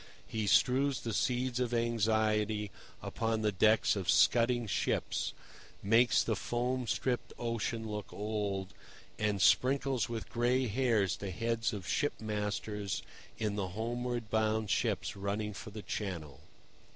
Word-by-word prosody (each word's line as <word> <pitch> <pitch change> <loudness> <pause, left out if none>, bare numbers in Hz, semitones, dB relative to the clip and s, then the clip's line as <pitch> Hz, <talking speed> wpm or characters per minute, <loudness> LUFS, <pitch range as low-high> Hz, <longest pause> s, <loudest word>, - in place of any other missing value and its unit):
He 110 -2 -2
strews 135 +5 +3
the 115 - -3
seeds 125 +2 0
of 120 -1 0
anxiety 110 -2 +1 0.3
upon 115 -1 -1
the 105 - +2
decks 110 +4 +4
of 95 -3 -3
scudding 120 +8 +4
ships, 100 - -1 0.5
makes 115 +4 +4
the 110 - 0
foam 125 +3 -1
stripped 125 +1 -1
ocean 115 -1 -2
look 105 -1 -5
old, 100 -2 -3 0.5
and 105 -2 +1
sprinkles 130 +3 +3
with 115 -2 -4
gray 125 +2 +2
hairs 110 -5 +1
the 100 - -5
heads 115 +4 -1
of 100 -5 -6
ship 145 -1 0
masters 105 -1 -3 0.3
in 105 -2 -1
the 95 -2 -1
homeward 120 0 -3
bound 110 -1 +1
ships - - 0
running 100 +2 -2
for 110 +3 -8
the 105 0 -8
Channel. 85 -8 -5
110 Hz, 135 wpm, -32 LUFS, 105-120 Hz, 0.5 s, decks